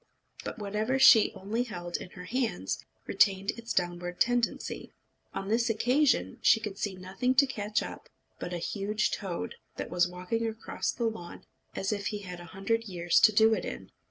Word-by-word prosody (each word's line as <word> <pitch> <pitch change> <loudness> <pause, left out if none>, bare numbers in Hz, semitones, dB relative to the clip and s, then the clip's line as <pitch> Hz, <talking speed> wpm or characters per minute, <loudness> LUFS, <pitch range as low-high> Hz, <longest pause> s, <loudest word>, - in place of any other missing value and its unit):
But - - -5
whatever 215 +4 -1
she 265 -5 +8
only 205 +4 -2
held 175 -8 -4
in - - -9
her 180 - -7
hands 225 - -2 0.2
retained 195 +1 +3
its 235 0 -8
downward 175 0 -1
tendency. 245 -1 0 0.4
On 195 - -5
this 230 +3 +2
occasion 245 - +2
she 225 - +6
could 210 -3 -6
see 200 -2 -2
nothing 195 +8 -1
to 275 +2 +7
catch 215 -5 -1
up - - -9 0.3
but 175 - -5
a 175 - -2
huge 210 +5 -1
toad, 185 -5 -4 0.2
that - - -5
was 180 0 +3
walking 185 +6 -2
across 225 0 -3
the 235 - -2
lawn 220 -6 -5 0.3
as 195 - -1
if 200 -1 -3
he 210 -1 -4
had 180 -2 -7
a 175 - -9
hundred 195 +6 -1
years 175 -4 +2
to 215 - +7
do 220 +1 +5
it - - -1
in. - - -6
210 Hz, 185 wpm, -29 LUFS, 180-230 Hz, 0.4 s, she